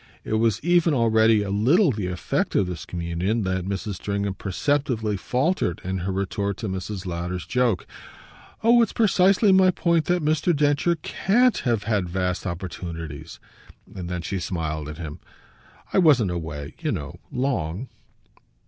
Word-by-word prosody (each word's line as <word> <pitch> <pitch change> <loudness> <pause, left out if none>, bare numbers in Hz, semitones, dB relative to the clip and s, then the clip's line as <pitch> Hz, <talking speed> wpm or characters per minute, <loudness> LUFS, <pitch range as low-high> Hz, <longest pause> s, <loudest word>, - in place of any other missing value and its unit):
It - - -4
was 110 -1 +2
even 175 -2 +3
already 110 -2 +4
a 100 - -4
little 140 - +4
the 105 -5 -3
effect 90 -1 -2
of 100 - +3
this 90 -4 -6
communion 90 +6 -2
that 95 -1 -2
Mrs. 100 0 -3
Stringham 100 0 -2
perceptibly 110 +2 -1
faltered 125 - 0
in 95 +1 -2
her 95 +2 -2
retort 100 +1 -2
to 110 - -4
Mrs. 95 +1 -5
Lowder's 90 0 -4
joke. 125 -7 +1 0.8
"Oh 235 +1 +6
it's 225 - +1
precisely 200 -2 +4
my 190 0 +6
point 170 -3 +1
that 175 -3 0
Mr. 155 +2 +2
Densher 145 +4 +2
CAN'T 215 +9 +2
have 115 -4 +1
had 105 -5 0
vast 90 +1 -2
opportunities." 85 -3 -6 0.5
And 90 -2 -6
then 90 -1 -3
she 95 +3 -3
smiled 80 -4 -3
at 75 - -7
him. 80 -1 -7 0.7
"I - - +4
wasn't 130 - +4
away, 80 -4 -5
you - - -1
know, - - -5
long." 125 - -2
100 Hz, 155 wpm, -24 LUFS, 90-145 Hz, 0.8 s, Oh